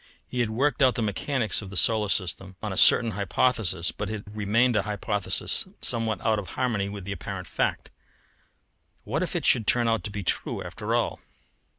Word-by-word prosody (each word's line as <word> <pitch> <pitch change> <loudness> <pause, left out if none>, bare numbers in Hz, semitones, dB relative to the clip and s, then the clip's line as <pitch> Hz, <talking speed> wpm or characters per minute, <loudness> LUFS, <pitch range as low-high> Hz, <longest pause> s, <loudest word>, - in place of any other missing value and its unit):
He 125 - -4
had 120 -2 +1
worked 140 +7 0
out 130 -2 +5
the 120 - -1
mechanics 110 +3 -1
of 100 - -8
the 100 - -4
solar 110 +1 +3
system 95 0 -2
on 105 -3 -2
a - - -5
certain 115 +4 +6
hypothesis, 100 -2 0
but 105 -1 -5
it 110 -1 -4
had 105 - -12
remained 115 +4 +2
a 105 - +3
hypothesis 105 0 -2
somewhat 110 -4 +1
out 110 -2 +3
of 95 - -7
harmony 110 -6 0
with 100 -2 -7
apparent 100 -3 -5
fact. - - -2 1.1
What - - -2
if - - -2
it - - -1
should 110 -3 +3
turn 120 -1 +3
out 115 -1 +1
to - - -2
be 100 -1 -5
true - - -1
after - - -3
all! - - 0
105 Hz, 195 wpm, -26 LUFS, 100-115 Hz, 1.1 s, certain